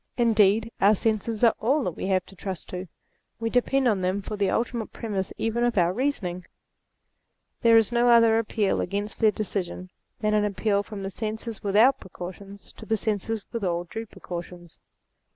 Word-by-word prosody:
Indeed 225 -1 +3
our 205 +2 +6
senses 220 +2 -1
are 230 - +6
all 275 +6 +2
that 180 - -1
we 170 - -5
have 185 -2 +1
to 195 - -16
trust 190 -1 -6
to. 180 +1 -5 0.5
We 225 0 -2
depend 260 +2 +2
on 205 -5 +2
them 185 +2 -1
for 210 - -5
the 200 -2 +1
ultimate 235 0 -1
premises 200 -4 -3
even 225 +2 0
of 240 -3 +1
our 175 0 +3
reasonings. 190 -8 -2 1.2
There 230 -1 +6
is 225 0 +3
no 240 0 +3
other 230 -1 +6
appeal 215 -3 0
against 205 +3 -3
their 220 - +5
decision 185 -3 -4 0.3
than 215 -1 +1
an 210 -1 +3
appeal 200 0 +1
from 205 -1 -8
the 195 - -4
senses 220 +1 -5
without 215 +7 +4
precautions 190 +3 -10
to - - -11
the 220 - +1
senses 215 +1 -2
with 230 -3 -4
all 175 -2 0
due 225 +6 -7
precautions. 175 -2 -9
210 Hz, 180 wpm, -26 LUFS, 190-225 Hz, 1.2 s, our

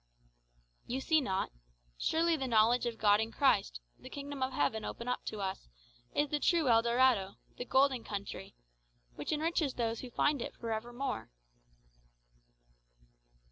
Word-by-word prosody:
"You 255 +2 -2
see 315 +3 +3
not? 190 -7 -1 0.4
Surely 330 - +2
the 270 -4 -3
knowledge 235 +1 +4
of 230 -1 -4
God 205 -1 +4
in 220 +1 -3
Christ, - - +2 0.2
the - - -11
kingdom 285 -1 -6
of 260 0 0
heaven 220 -4 0
opened 240 +1 -4
up - - -3
to 215 - -5
us, 190 - -4 0.5
is 290 0 +2
the 295 - 0
true 325 -3 +2
El 230 -1 +6
Dorado, 235 -5 +2 0.2
the 245 - -4
golden 260 -2 +3
country, 200 - -6 0.6
which - - -5
enriches 310 -2 0
those 230 -1 -1
who 255 - -7
find 285 +2 +1
it - - -5
for 230 -1 -5
ever 220 +2 -3
more." 245 - -4
245 Hz, 155 wpm, -33 LUFS, 220-280 Hz, 0.6 s, El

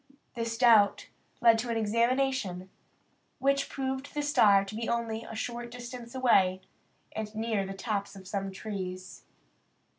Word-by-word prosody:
This 230 -1 -3
doubt 225 -5 +5 0.3
led 230 -1 +6
to 240 +2 -3
an 230 - 0
examination, 230 -4 0 0.7
which 275 +1 +1
proved 265 +1 -4
the 295 - 0
star 205 -9 +5
to 195 - -8
be 225 +1 -3
only 230 -1 -2
a 225 - -8
short 240 +1 -4
distance 240 0 -9
away, 190 -8 +3 0.5
and 215 0 -5
near 220 -3 -1
the 195 - -6
tops 200 0 -3
of 190 -1 -12
some 195 0 -3
trees. 185 -2 -6
225 Hz, 145 wpm, -29 LUFS, 200-245 Hz, 0.7 s, led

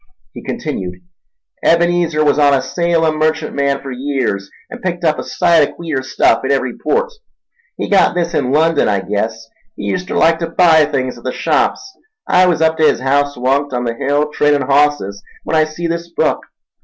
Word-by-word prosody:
He - - -9
continued. 100 - -4 0.7
"Ebenezer 170 -2 +2
was 145 0 +2
on 145 -1 +5
a 135 - 0
Salem 165 -1 0
merchantman 150 -3 -1
for 135 - -6
years, 125 -7 -3 0.2
an' 245 - -8
picked 175 -4 -4
up 155 -2 +1
a - - -4
sight 170 -5 +2
o' - - -13
queer 160 -6 -3
stuff 130 -3 +1
in 135 - -2
every 130 -3 0
port. 475 +2 -1 0.6
He - - -3
got 195 -3 +3
this 170 -1 -1
in 125 - 0
London, 160 +2 +2
I 100 -2 0
guess—he 110 0 -5
uster 185 +2 -4
like 165 +1 +3
ter 165 -1 -3
buy 165 -2 +4
things 130 -4 -3
at - - -18
the 130 - -2
shops. 390 - -1 0.3
I 185 0 +4
was 165 -3 +1
up 160 0 +1
ta 155 - +4
his - - +3
haouse 140 +1 0
onct, 135 +2 0
on 125 0 -1
the 115 -1 -2
hill, 145 +5 -1
tradin' 145 -1 +2
hosses, 140 -7 +1 0.2
when - - -2
I 155 0 +4
see 155 +2 -6
this 170 0 -3
book. - - -1
150 Hz, 190 wpm, -16 LUFS, 130-170 Hz, 0.7 s, on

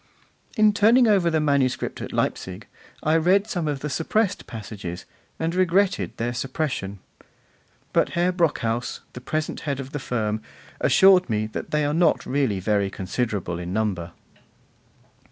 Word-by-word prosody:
In 215 -1 +5
turning 230 +5 +5
over 195 -5 +4
the 160 -1 +1
manuscript 140 -4 0
at - - -6
Leipzig, - - -2 0.4
I 155 +1 +3
read 185 +5 +3
some 175 -7 -2
of 145 -2 -2
the 150 - -3
suppressed 195 +8 0
passages, 100 -6 -7 0.3
and 165 +1 -1
regretted 185 +2 +1
their 120 +1 -2
suppression; 130 -6 -3 1.0
but - - +3
Herr 175 +1 +3
Brockhaus, 125 -10 -1
the 125 - -8
present 155 +4 -3
head 140 -2 -3
of 135 0 -6
the 145 - -3
firm, 110 -4 -2 0.4
assured 190 -3 +5
me 110 -1 0
that - - -5
they 150 -1 +1
are 145 - 0
not 165 0 +2
really 130 -8 0
very 100 0 +1
considerable 95 -3 -3
in 90 +1 -5
number. 95 -5 -1
140 Hz, 150 wpm, -24 LUFS, 110-175 Hz, 1.0 s, In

